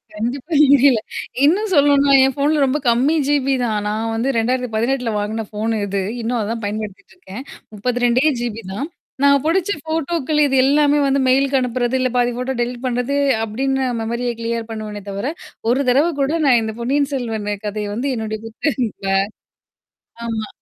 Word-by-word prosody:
கண்டிப்பா 245 Hz, +8 st, -4 dB, 0.2 s
தெரியல. 270 Hz, -4 st, +5 dB, 0.5 s
இன்னும் 390 Hz, +7 st, +2 dB
சொல்லணுன்னா 285 Hz, -1 st, +4 dB
ஏன் 265 Hz, 0 st, +2 dB
ஃபோன்ல 290 Hz, +1 st, +2 dB
ரொம்ப 270 Hz, +3 st, 0 dB
கம்மி 255 Hz, +7 st, +3 dB
ஜிபி 275 Hz, -2 st, +2 dB
தான். 215 Hz, -2 st, 0 dB
நான் 220 Hz, +2 st, -2 dB
வந்து 235 Hz, +4 st, 0 dB
2018ல 245 Hz, +1 st, 0 dB
வாங்கின 215 Hz, +2 st, -3 dB
ஃபோன்னு 220 Hz, +1 st, -2 dB
இது. 195 Hz, 0 st, -1 dB, 0.2 s
இன்னும் 235 Hz, +1 st, -1 dB
அதான் 225 Hz, +2 st, -3 dB
பயன்படுத்திட்டுருக்கேன். 210 Hz, -, -7 dB, 0.3 s
32டே 245 Hz, +4 st, +1 dB, 0.2 s
ஜிபி 230 Hz, -2 st, -4 dB
தான். 245 Hz, +9 st, -3 dB, 0.4 s
நான் 280 Hz, -1 st, +5 dB
புடிச்ச 345 Hz, +4 st, +1 dB
ஃபோட்டோக்கள் 315 Hz, -1 st, -1 dB
இது 270 Hz, -, 0 dB
எல்லாமே 290 Hz, +2 st, +3 dB
வந்து 275 Hz, 0 st, +2 dB
மெயிலுக்கு 270 Hz, +1 st, +3 dB
அனுப்புறது, 250 Hz, 0 st, -1 dB
இல்ல 255 Hz, 0 st, +1 dB
பாதி 245 Hz, 0 st, +2 dB
ஃபோட்டோ 250 Hz, +2 st, -2 dB
டெலீட் 240 Hz, +1 st, -3 dB
பண்றது 250 Hz, +2 st, -1 dB, 0.3 s
அப்பிடின்ன 265 Hz, +4 st, -1 dB
மெமரிய 235 Hz, +2 st, -2 dB
கிளியர் 230 Hz, 0 st, -3 dB
பண்ணுவேனே 215 Hz, -2 st, -6 dB
தவிர, 200 Hz, +5 st, -3 dB, 0.4 s
ஒரு 255 Hz, -, +2 dB
தடவ 280 Hz, +7 st, +3 dB
கூட 275 Hz, +2 st, +1 dB
நான் 250 Hz, -4 st, +5 dB
இந்த 220 Hz, 0 st, -3 dB
"பொன்னியன் 275 Hz, +3 st, +1 dB
செல்வன்" 225 Hz, -5 st, -3 dB, 0.2 s
கதைய 210 Hz, 0 st, -3 dB
வந்து 250 Hz, +5 st, -2 dB
என்னுடைய 220 Hz, -1 st, -4 dB
புத்தக 225 Hz, -5 st, -1 dB, 1.1 s
ஆமா. 220 Hz, -2 st, -3 dB
245 Hz, 150 wpm, -19 LUFS, 225-275 Hz, 1.1 s, தெரியல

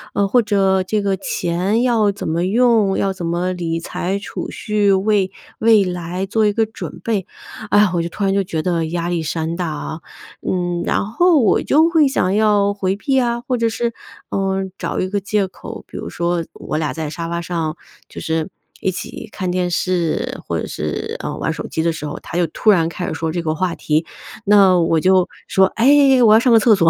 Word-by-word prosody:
呃， 200 Hz, -1 st, +2 dB
或 245 Hz, +5 st, +4 dB
者 195 Hz, -3 st, +2 dB
这 205 Hz, +2 st, -1 dB
个 195 Hz, -1 st, +1 dB
钱 185 Hz, +9 st, -1 dB
要 225 Hz, -5 st, +3 dB
怎 195 Hz, -, -6 dB
么 170 Hz, +3 st, 0 dB
用， 220 Hz, -2 st, +3 dB
要 195 Hz, -1 st, 0 dB
怎 175 Hz, -3 st, -5 dB
么 175 Hz, +2 st, -1 dB
理 165 Hz, -2 st, -2 dB
财、 185 Hz, +3 st, -3 dB
储 200 Hz, -, -6 dB
蓄， 210 Hz, -2 st, 0 dB
为 195 Hz, 0 st, +2 dB, 0.3 s
未 220 Hz, -3 st, +5 dB
来 180 Hz, +1 st, -3 dB
做 215 Hz, +2 st, +1 dB
一 210 Hz, -, +3 dB
个 225 Hz, 0 st, +2 dB
准 220 Hz, -, -8 dB
备。 210 Hz, -5 st, -1 dB, 0.4 s
哎 -, -, +3 dB
呀， 210 Hz, -3 st, +4 dB
我 170 Hz, -, +1 dB
就 170 Hz, -, -3 dB
突 200 Hz, -, -5 dB
然 195 Hz, 0 st, +2 dB
就 200 Hz, 0 st, +2 dB
觉 165 Hz, -4 st, -3 dB
得 165 Hz, -2 st, 0 dB
压 170 Hz, +1 st, -2 dB
力 175 Hz, -2 st, -1 dB
山 160 Hz, +1 st, -2 dB
大 175 Hz, -2 st, -2 dB
啊。 155 Hz, +1 st, -5 dB, 0.5 s
嗯， 175 Hz, -1 st, -1 dB
然 -, -, 0 dB
后 335 Hz, -, +3 dB
我 220 Hz, -, +3 dB
就 315 Hz, +3 st, +3 dB
会 315 Hz, -4 st, +5 dB
想 190 Hz, -8 st, 0 dB
要 205 Hz, -2 st, +3 dB
回 195 Hz, -1 st, -1 dB
避 265 Hz, +5 st, +1 dB
啊， 240 Hz, -1 st, 0 dB
或 245 Hz, +1 st, -2 dB
者 230 Hz, 0 st, +1 dB
是， 235 Hz, +1 st, -2 dB, 0.4 s
嗯， 195 Hz, -1 st, -1 dB
找 -, -, -3 dB
一 185 Hz, -, -2 dB
个 205 Hz, -, -1 dB
借 200 Hz, 0 st, 0 dB
口。 185 Hz, -, -10 dB
比 -, -, -9 dB
如 85 Hz, -, -5 dB
说， 170 Hz, -, -1 dB
我 -, -, -4 dB
俩 155 Hz, -2 st, -1 dB
在 155 Hz, -2 st, -4 dB
沙 165 Hz, +1 st, -5 dB
发 170 Hz, 0 st, -2 dB
上 165 Hz, -2 st, -3 dB, 0.3 s
就 -, -, -9 dB
是 160 Hz, +2 st, -2 dB, 0.3 s
一 190 Hz, -, 0 dB
起 185 Hz, -, -7 dB
看 185 Hz, -3 st, -3 dB
电 180 Hz, -1 st, 0 dB
视， 175 Hz, -2 st, -1 dB
或 -, -, -1 dB
者 -, -, -3 dB
是， 75 Hz, 0 st, -4 dB
呃， -, -, -4 dB
玩 -, -, -1 dB
手 -, -, -5 dB
机 160 Hz, -, -2 dB
的 170 Hz, -, +2 dB
时 160 Hz, -2 st, -6 dB
候， 145 Hz, -, -5 dB
他 170 Hz, -, -6 dB
就 175 Hz, -, +2 dB
突 210 Hz, +7 st, +2 dB
然 165 Hz, -4 st, +3 dB
开 175 Hz, +1 st, -5 dB
始 -, -, -3 dB
说 160 Hz, 0 st, -2 dB
这 175 Hz, -, -2 dB
个 155 Hz, -1 st, -1 dB
话 180 Hz, +1 st, -1 dB
题。 155 Hz, +2 st, 0 dB, 0.4 s
那 195 Hz, -3 st, +6 dB
我 165 Hz, -1 st, +2 dB
就 185 Hz, -1 st, +4 dB, 0.2 s
说： 190 Hz, 0 st, +4 dB
“哎， 270 Hz, +1 st, +5 dB
我 215 Hz, -1 st, +7 dB
要 220 Hz, -, +7 dB
上 245 Hz, 0 st, +3 dB
个 225 Hz, -, +8 dB
厕 220 Hz, 0 st, +5 dB
所。” 165 Hz, -4 st, +4 dB
190 Hz, 240 characters per minute, -19 LUFS, 170-210 Hz, 0.5 s, 个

